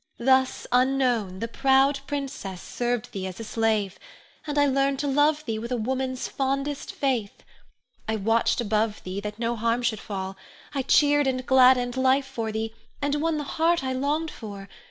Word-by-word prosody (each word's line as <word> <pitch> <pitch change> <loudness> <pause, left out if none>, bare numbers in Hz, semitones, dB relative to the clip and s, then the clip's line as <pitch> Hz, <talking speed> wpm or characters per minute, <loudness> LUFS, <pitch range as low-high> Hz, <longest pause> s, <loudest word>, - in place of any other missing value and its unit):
Thus, 260 +1 +2
unknown, 250 -7 +1
the 230 - -1
proud 270 +3 +3
princess 270 -10 -4
served 240 +2 -3
thee 190 -1 -4
as 185 +2 -8
a - - -5
slave, 220 -3 0 0.5
and 295 0 -2 0.2
learned 275 0 +2
to 290 - -2
love 295 +2 +2
thee 220 -2 -2
with 235 +2 -6
a 250 - +1
woman's 260 +2 -2
fondest 275 +1 -2
faith. 250 -7 -2 0.6
I 220 - 0
watched 225 +4 +1
above 215 -1 0
thee 185 +2 -4
that 210 +1 -6
no 235 +1 -1
harm 230 +2 0
should 225 -3 0
fall; 190 -1 -5 0.4
I 275 - 0
cheered 290 +1 +4
and 255 -1 -1
gladdened 255 -1 +5
life 265 +1 +3
for 230 -5 -4
thee, 220 +1 -3 0.3
and 290 +1 0
won 325 -1 +1
the 295 - -2
heart 330 +2 +1
I 260 0 -1
longed 295 +5 -1
for. 200 -3 -9
255 Hz, 175 wpm, -25 LUFS, 220-275 Hz, 0.6 s, gladdened